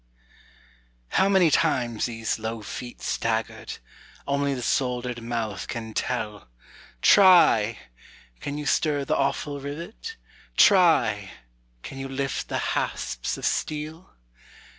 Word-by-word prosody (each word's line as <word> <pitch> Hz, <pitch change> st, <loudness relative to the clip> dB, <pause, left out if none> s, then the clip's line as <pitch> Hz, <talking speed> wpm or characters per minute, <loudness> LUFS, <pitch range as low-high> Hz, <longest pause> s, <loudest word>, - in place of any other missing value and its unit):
How 195 Hz, -, +3 dB
many 185 Hz, -5 st, +4 dB
times 120 Hz, -5 st, +1 dB
these 115 Hz, -1 st, -3 dB
low 110 Hz, 0 st, -4 dB
feet 120 Hz, +3 st, -8 dB
staggered, 110 Hz, 0 st, -2 dB, 0.5 s
Only 140 Hz, 0 st, 0 dB
the 125 Hz, -, -5 dB
soldered 125 Hz, -1 st, -1 dB
mouth 115 Hz, -3 st, -3 dB
can 110 Hz, -1 st, -5 dB
tell; 105 Hz, -, -3 dB, 0.5 s
Try! 170 Hz, -, +6 dB, 0.6 s
can 145 Hz, +1 st, -5 dB
you 150 Hz, -, -5 dB
stir 145 Hz, -2 st, +1 dB
the -, -, +1 dB
awful 140 Hz, +1 st, -1 dB
rivet? 170 Hz, -, -7 dB, 0.4 s
Try! 160 Hz, -, +5 dB, 0.5 s
can 135 Hz, -, -8 dB
you 135 Hz, -, -4 dB
lift 135 Hz, 0 st, -3 dB
the -, -, -1 dB, 0.2 s
hasps -, -, -2 dB
of -, -, -5 dB
steel? 155 Hz, +3 st, -3 dB
130 Hz, 115 wpm, -25 LUFS, 115-150 Hz, 0.6 s, Try